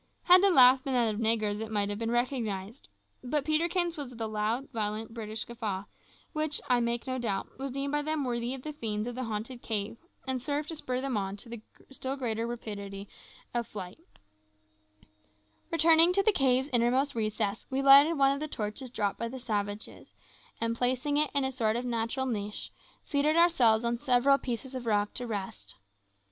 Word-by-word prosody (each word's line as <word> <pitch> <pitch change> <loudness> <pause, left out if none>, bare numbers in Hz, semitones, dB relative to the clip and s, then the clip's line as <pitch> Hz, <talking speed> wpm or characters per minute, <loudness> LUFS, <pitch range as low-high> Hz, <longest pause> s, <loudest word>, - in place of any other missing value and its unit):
Had 360 +1 +7
the 400 - +5
laugh 260 -5 +7
been 270 - -2
that 235 -3 +2
of 210 - -5
negroes 220 -2 +1
it 220 0 -5
might 205 -2 0
have 205 0 -4
been 230 0 -2
recognised; 235 -3 -2 0.3
but 275 +3 -1
Peterkin's 340 +2 0
was 285 -4 -5
the 230 -2 -5
loud, 215 +5 -2
violent, 220 0 -3
British 220 -1 -5
guffaw, 215 -5 -4 0.5
which, 310 -1 -1
I 250 -1 +3
make 235 0 -1
no 260 -1 -3
doubt, 210 -1 -3
was 275 0 -3
deemed 275 +2 -3
by 295 0 +1
them 310 0 -1
worthy 240 0 -2
of 260 - -11
the 305 - -5
fiends 215 -5 -3
of 245 - -4
the 255 +1 -4
haunted 225 +3 -5
cave, 210 0 -2 0.3
and 260 -2 -2
served 290 +3 -2
to 325 - -4
spur 255 -4 -2
them 265 -4 -1
on 195 0 -3
to 230 +1 -9 0.3
still 265 0 -4
greater 230 -4 -2
rapidity 200 -4 -6
in 200 - -10 0.5
their 240 -1 0
wild 185 -2 -6
career. 330 - -29 1.6
Returning 330 0 +6
into 395 +2 +2
the 435 - +5
cave's 265 -5 +2
innermost 250 +4 +2
recess, 215 -2 -2
we 265 +1 -1
lighted 280 +4 +8
one 275 0 +5
of 280 - -2
the 305 - -3
torches 220 +1 -4
dropped 205 -4 -2
by 230 - -2
the 260 +3 -7
savages, 210 -4 -4 0.4
and 230 0 0
placing 255 +4 0
it 300 -1 +3
in 280 - +2
a 265 - -1
sort 225 -4 0
of 245 +1 -2
natural 235 +2 -1
niche, 210 -4 -3 0.3
seated 300 +2 +1
ourselves 255 -10 +4
on 235 0 -1
several 275 +1 +3
pieces 255 +1 -5
of 250 -2 -6
rock 205 -1 +1
to 245 - -3
rest. 190 - -6
245 Hz, 195 wpm, -29 LUFS, 220-275 Hz, 1.6 s, lighted